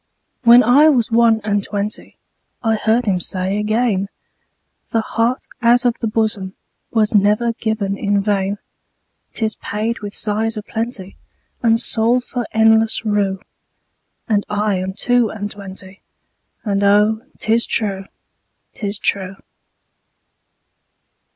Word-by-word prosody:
When 240 +1 +8
I 280 +7 +6
was 245 -5 +1
one 225 -1 +4
and 205 -1 0
twentyI 205 +1 -5 0.5
heard 225 +1 +1
him 190 -4 +1
say 185 +3 -1
again,'The 215 0 -4
heart 230 +3 -1 0.2
out 240 +1 +4
of 240 -1 +1
the 230 - -2
bosomWas 215 0 -2
never 210 +3 +3
given 220 -3 -2
in 200 0 +1
vain;'Tis 205 +2 -4
paid 220 +3 -3
with 205 -1 -7
sighs 220 +1 -1
a 210 - -5
plentyAnd 225 +1 -3
sold 235 +1 +2
for 245 -2 -4
endless 220 0 +3
rue.'And 205 +1 -4
I 205 -1 0
am 190 +1 -4
two 245 +2 +1
and 205 -1 -5
twenty, 195 -1 -9 0.6
And 200 -2 0
oh, 210 +2 +3 0.2
'tis 230 +2 +1
true, 195 -3 -1 0.7
'tis 205 -1 -4
true. 195 -1 -1
215 Hz, 110 wpm, -18 LUFS, 200-230 Hz, 0.7 s, When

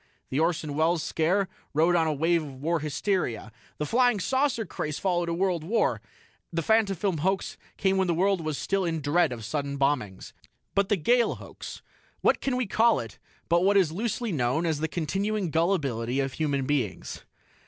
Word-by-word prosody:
The 135 - 0
Orson 160 -2 0
Welles 160 +2 +1
scare 185 +5 +1 0.3
rode 165 +3 +4
on 165 -2 +3
a - - +1
wave 165 +3 +2
of 140 -3 -8
war 160 +5 -1
hysteria; 150 - -2 0.3
the 150 - -2
Flying 245 - +3
Saucer 260 +1 +1
craze 150 -5 -4
followed 175 -3 0
world 175 -1 0
war; 220 +8 +1 0.5
the 165 -1 -1
Fantafilm 200 -5 +2
hoax 190 +5 -1 0.2
came 195 -1 +2
when 190 -1 +2
the 170 - +1
world 190 +1 +2
was 155 -3 -3
still 195 0 0
in 165 -3 -1
dread 150 +2 +2
of 115 -3 -6
sudden 140 +2 -3
bombings. 135 -9 -1 0.4
But 200 0 +1
the 205 - +3
Gale 235 +9 +2
Hoax - - -10 0.4
what - - +3
can 265 -2 0
we 250 -1 0
call 225 +3 +3
it 115 -4 -8 0.3
but 170 +1 +3
what 200 +1 +4
is 180 -6 +3
loosely 225 +4 -2
known 135 +2 0
as 160 -3 0
the 160 - 0
continuing 195 +4 -2
gullibility 140 - 0
of 135 -1 -1
human 140 -4 -1
beings? 130 -10 -2
170 Hz, 180 wpm, -27 LUFS, 145-195 Hz, 0.5 s, rode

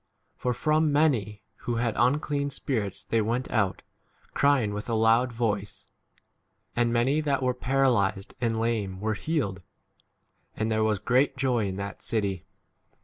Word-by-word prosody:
For 125 - -1
from 155 +4 +2
many 145 -3 +4
8 105 +1 -10 0.2
who 120 - -3
had 115 -1 0
unclean 140 +3 +1
spirits 110 -9 -3
they 115 - +1
went 120 +4 -2
out, 100 -5 0 0.5
crying 135 -7 +2
with 105 +3 -5
a 115 - +1
loud 115 +3 +3
voice; 105 -4 -2 0.9
and 120 0 +2
many 130 +6 +2
that 140 -3 0
were 125 0 +2
para 135 +2 +1
8 - - +5 0.2
lyzed 95 0 -11
and 115 -2 0
lame 110 -5 -1
were 110 +2 -1
healed. 105 - -2 0.9
And 110 +1 -1
there 110 0 +2
was 110 -1 +2
great 130 +6 +2
joy 125 -5 +1
in 95 - -4
that 100 +1 -6
city. 100 -5 -2
115 Hz, 160 wpm, -27 LUFS, 105-135 Hz, 0.9 s, 8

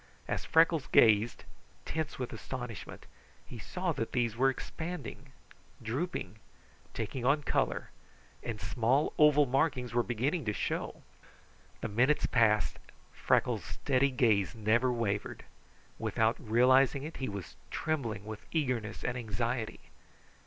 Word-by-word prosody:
As - - -2
Freckles 165 -2 +3
gazed, 110 +1 +4 0.4
tense 160 -2 -3
with 125 -2 -4
astonishment, 120 -2 -7 0.4
he - - -9
saw - - -2
that 115 - -3
these 120 -3 +1
were 135 +3 +4
expanding, 150 -1 -6 0.5
drooping, 115 - -3 0.5
taking 130 - -4
on 145 +4 +3
color, - - -1 0.5
and 115 -3 -5
small, 130 +7 +1
oval 150 -1 +6
markings 130 -2 0
were 120 - +3
beginning 130 +8 -1
to 105 - 0
show. - - -3 0.8
The - - -2
minutes 130 +8 +2
passed. 110 -5 +2 0.3
Freckles' - - +1
steady 140 0 +1
gaze 110 -8 +2
never 115 +4 +2
wavered. 105 -4 -2 0.5
Without 110 +1 +1
realizing 130 +4 +4
it, 160 +2 -7
he 130 - -3
was 100 -3 -7
trembling 115 -10 -2
with 110 -1 -8
eagerness 125 -9 -1
and 125 - -1
anxiety. 115 0 -3
125 Hz, 125 wpm, -31 LUFS, 110-140 Hz, 0.8 s, oval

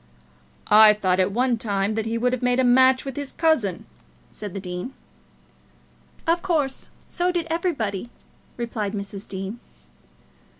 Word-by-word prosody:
"I 215 0 +8
thought 185 -3 +1
at 185 +1 +2
one 245 +1 +1
time 200 -1 -1
that 220 0 -2
he 230 +1 -1
would 250 +2 +1
have 255 - -2
made 250 0 +2
a - - +4
match 260 +1 +4
with 270 -2 -5
his 285 -2 -5
cousin," 255 - 0 0.5
said 205 -3 -8
the - - -3
dean. 180 +7 -6 1.3
"Of 335 +1 +2
course; 305 -8 -1 0.2
so 355 0 0
did 345 -2 -1
everybody," 240 - -2 0.5
replied 230 -4 -3
Mrs. 200 0 -6
Dean. 195 +4 -6
230 Hz, 145 wpm, -23 LUFS, 200-265 Hz, 1.3 s, I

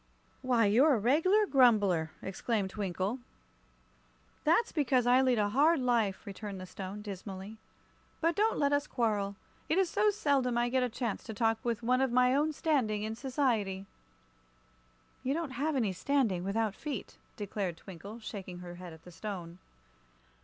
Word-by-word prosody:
"Why, 245 -4 +3
you're 255 +8 +5
a - - 0
reg'lar 330 - +3
grumbler!" 205 - +4
exclaimed 195 0 -2
Twinkle. 195 +3 -2 1.3
"That's 340 +10 +3
because 260 -5 +2
I 250 +2 +5
lead 255 -2 +3
a 205 -1 +2
hard 300 +8 +4
life," 235 -6 +1
returned 200 -1 -6
the 185 - -7
Stone, 195 +2 -7
dismally. 200 +1 -7 0.6
"But 335 0 +1
don't 435 +4 +2
let 285 0 +2
us 285 +1 +1
quarrel; 205 -4 0 0.3
it 320 - +2
is 380 -3 +2
so 420 +1 +3
seldom 275 - +1
I 240 0 +2
get 260 +1 +1
a 250 - +1
chance 235 -2 -3
to 220 - -6
talk 225 0 +1
with 235 -1 -2
one 255 +2 +2
of 265 -2 +1
my 250 +1 +4
own 295 +3 +2
standing 255 -10 0
in 220 +1 -3
society." 230 -7 -1 1.4
"You 270 +3 -1
can't 325 -4 -3
have 290 +5 -1
any 220 -7 +1
standing, 215 -4 0
without 210 +2 0
feet," 280 -2 -6 0.2
declared 195 -4 -3
Twinkle, 195 +5 -10
shaking 190 -5 -7
her 175 -1 -8
head 175 -2 -8
at 160 - -15
the 180 - -12
Stone. 175 -1 -7
230 Hz, 165 wpm, -31 LUFS, 200-270 Hz, 1.4 s, you're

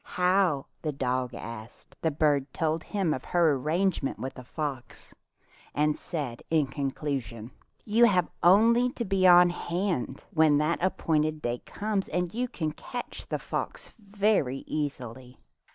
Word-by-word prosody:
"How?" 180 -5 +3 0.2
the 155 - -1
dog 130 -2 -2
asked. 115 0 -9
The 160 - +2
bird 145 -3 +1
told 160 0 0
him 190 -5 -1
of 130 - -5
her 170 -4 +3
arrangement 155 +3 0
with 130 - -5
the 125 - -10
fox, 140 -1 -6 0.6
and 150 +1 +2
said 140 -8 -5
in 160 -3 +3
conclusion, 135 -5 -4 0.3
"You 230 +3 +5
have 185 -6 +3
only 230 +7 +5
to 235 - -3
be 190 -1 +3
on 175 0 +8
hand 175 -7 -2
when 155 -2 +5
the 150 +3 +2
appointed 155 -4 +1
day 120 0 -1
comes, 205 -2 -2
and 180 -1 -1
you 245 +2 -1
will 155 -2 0
catch 245 -1 -7
the - - -1
fox - - -5
very 200 - 0
eas 150 -3 -2
ily." 125 +1 -10
155 Hz, 150 wpm, -28 LUFS, 135-185 Hz, 0.6 s, on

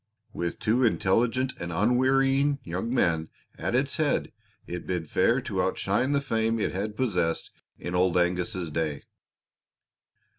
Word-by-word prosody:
With 85 -1 -3
two 120 +4 +1
intelligent 120 +4 +2
and 85 0 -4
unwearying 135 - +3
young 95 +6 -3
men 80 -10 +1 0.3
at - - -2
its - - +1
head - - 0 0.3
it 90 0 -6
bid 90 -3 -2
fair - - +2
to - - -2
outshine 130 +3 0
the 140 - +3
fame 115 -4 0
it - - 0
had 105 +3 -4
possessed 90 -10 0 0.3
in 90 - -5
Old 90 0 +2
Angus's 90 -1 0
day. 75 -3 -2
100 Hz, 140 wpm, -27 LUFS, 85-125 Hz, 0.3 s, unwearying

